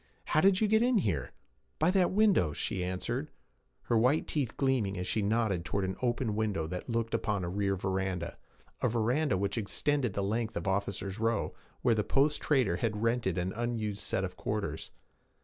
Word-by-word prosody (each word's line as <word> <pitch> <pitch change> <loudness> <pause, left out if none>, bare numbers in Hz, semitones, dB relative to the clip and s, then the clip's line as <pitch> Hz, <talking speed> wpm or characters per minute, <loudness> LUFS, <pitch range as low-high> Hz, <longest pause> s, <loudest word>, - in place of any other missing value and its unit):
'How 155 - +2
did 195 +1 +5
you 215 - +3
get 220 +1 +4
here?' 130 - +1 0.5
'By 160 +4 +3
that 185 -2 +3
window,' 195 - +3
she 90 +5 -2
answered, 120 +11 -3 0.5
her 120 - 0
white 125 +7 +3
teeth 140 -7 -1
gleaming 125 -8 +1
as 90 - -3
she 110 - 0
nodded 105 -4 +1
toward 100 +3 -1
an 95 - -3
open 120 -3 0
window 105 -7 0
that 90 +8 -6
looked 115 -1 -1
upon 100 -3 0
a 85 - -2
rear 100 +1 0
veranda 95 -2 -2 0.4
a - - +3
veranda 120 +2 +1
which 100 +3 -1
extended 125 +2 0
the 100 - -1
length 110 +3 -1
of - - -4
'officers' 100 +1 -2
row,' 115 -1 0 0.3
where 120 - +4
the 105 -1 +1
post 145 +6 +2
trader 125 - +2
had 105 0 -1
rented 115 -6 +1
an 90 +1 -1
unused 110 -3 -2
set 95 - -1
of 90 -1 -4
quarters. 100 -8 -3
110 Hz, 185 wpm, -31 LUFS, 95-125 Hz, 0.5 s, did